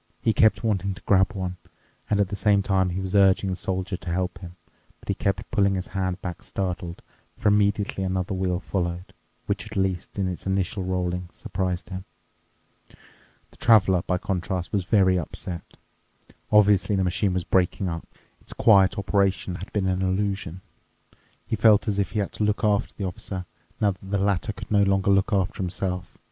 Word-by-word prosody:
He 110 - +1
kept 110 +2 +3
wanting 100 -3 0
to - - -12
grab 95 -1 +3
one, 90 -2 -4 0.5
and 105 - +2
at 100 -3 +2
the 100 - -3
same 100 -1 +3
time 95 -2 +2
he 90 +2 -3
was 95 0 -4
urging 95 -1 +4
the - - -1
Soldier 95 0 -3
to 90 - -8
help 90 +1 -2
him. 90 -2 -10 0.4
But - - -18
he - - +3
kept 100 +2 -2
pulling 100 -1 +2
his 90 0 -4
hand 95 -1 -2
back 90 -2 -5
startled, 90 -2 -4 0.3
for - - +2
immediately 100 -1 +1
another 95 +1 -1
wheel 90 -1 0
followed, 90 -2 -3 0.3
which, 100 -1 -2
at 105 -1 -7
least 95 -1 -1
in 95 -2 0
its 90 +1 -5
initial 95 0 -1
rolling, 90 -1 -2
surprised 90 -1 -3
him. 95 -1 -6 0.8
The - - -25
Traveler, 95 -6 +5
by 90 +1 -1
contrast, 95 -1 -3
was 100 -3 0
very 95 -2 +4
upset. 85 +2 -7 0.7
Obviously 105 -1 +4
the 95 - +1
machine 90 +1 0
was 90 - 0
breaking 95 +2 +1
up. 85 -1 -4 0.3
Its - - -7
quiet 100 -4 +5
operation 100 -2 +1
had 95 - -9
been 100 -2 0
an 95 0 0
illusion. 95 -2 -1 0.8
He - - -1
felt 110 0 +5
as 100 -1 0
if 100 - -1
he 110 - 0
had 100 - -3
to - - -3
look 105 +2 0
after 105 -2 +2
the 100 - -3
Officer, 90 0 -5 0.3
now 105 -2 +3
that 95 - -11
the 100 - +1
latter 100 +1 0
could 100 - -10
no 105 -1 +4
longer 95 0 +3
look 100 +3 +3
after 95 -2 0
himself. 90 0 -3
95 Hz, 185 wpm, -25 LUFS, 90-100 Hz, 0.8 s, Traveler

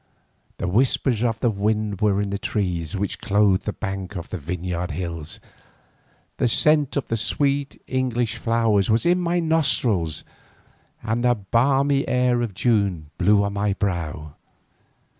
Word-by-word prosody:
The - - -3
whispers 120 +3 +1
of 115 -2 0
the 120 - +2
wind 105 -1 -1
were 100 -2 +2
in 100 -1 -2
the 100 - -2
trees 90 -6 -2
which 100 +1 -3
clothe 100 -2 +2
the 105 - -1
bank 95 -1 -5
of 85 0 -6
the - - -5
Vineyard 90 +3 -4
Hills, 85 -1 -4 1.0
the - - +2
scent 150 +3 +2
of 140 - -1
the 115 - -2
sweet 140 +5 -1
English 120 -3 -1
flowers 115 -4 +1
was 110 +7 +2
in 175 +1 +3
my 175 0 0
nostrils 125 - +1 0.8
and 115 +2 -1
the 120 0 +4
balmy 135 +7 +1
air 125 -1 +2
of 110 -6 -3
June 100 -11 0
blew 100 +2 +4
on 100 0 -2
my 100 0 0
brow. 80 -7 -3
105 Hz, 150 wpm, -23 LUFS, 95-125 Hz, 1.0 s, the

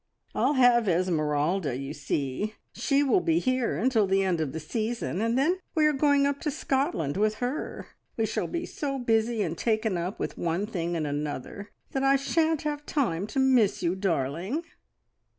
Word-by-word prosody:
"I'll - - +2
have 245 -4 +5
Esmeralda, 160 -3 +1
you 135 +2 -5
see! 145 +7 -2 0.2
She 280 0 +2
will 285 +7 +3
be 330 -2 +1
here 255 - 0
until 225 0 +2
the 195 +1 +2
end 180 -4 0
of 150 -4 -2
the 160 - -4
season, 215 +3 -3
and 230 +2 +1
then 340 +8 +2 0.2
we 310 -2 +4
are 305 - +4
going 285 0 +3
up 280 0 0
to 305 - -1
Scotland 270 - -1
with 215 +1 +2
her. 250 +6 -4 0.3
We 225 - +2
shall 220 - -2
be 340 0 -3
so 275 -5 -3
busy 225 -2 +1
and 165 -3 -2
taken 220 0 0
up 180 +4 -4
with - - -4
one 170 +4 0
thing 175 -5 -3
and 160 -2 -1
another 145 +7 -4 0.2
that 270 - -1
I 270 0 +4
shan't 315 +3 +1
have 295 -1 -3
time 205 - 0
to 270 - -2
miss 245 -8 +3
you, 170 0 +2
darling." 185 - -1
220 Hz, 185 wpm, -27 LUFS, 170-270 Hz, 0.3 s, have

